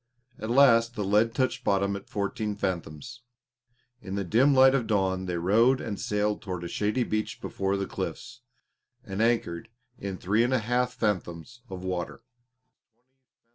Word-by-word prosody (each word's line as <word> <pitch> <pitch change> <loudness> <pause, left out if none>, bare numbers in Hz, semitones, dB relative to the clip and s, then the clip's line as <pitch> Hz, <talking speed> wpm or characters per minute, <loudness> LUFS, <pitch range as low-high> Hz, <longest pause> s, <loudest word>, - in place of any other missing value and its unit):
At 110 - -5
last 120 -2 +5
the 105 - -2
lead 105 +4 +2
touched 130 0 0
bottom 100 -1 +1
at 100 - -9
fourteen 105 +1 -2
fathoms. 95 - -4 0.8
In 95 +1 -6
the 100 - -1
dim 120 +10 +3
light 130 -1 +6
of 125 -5 0
dawn 95 -3 0
they 90 -1 -2
rowed 115 +9 +3
and 105 -3 -5
sailed 105 0 -1
toward 90 -6 -5
a - - -4
shady 105 +7 0
beach 110 -2 -3
before 95 0 -2
the 100 - -2
cliffs, 125 - -6 0.6
and 100 -3 -4
anchored 115 -4 0 0.3
in 95 -1 -5
three 105 +6 +1
and 125 +2 +1
a - - +2
half 125 +3 0
fathoms 105 +2 -3
of 95 -1 -7
water. 95 +4 -4
105 Hz, 160 wpm, -27 LUFS, 95-120 Hz, 0.8 s, light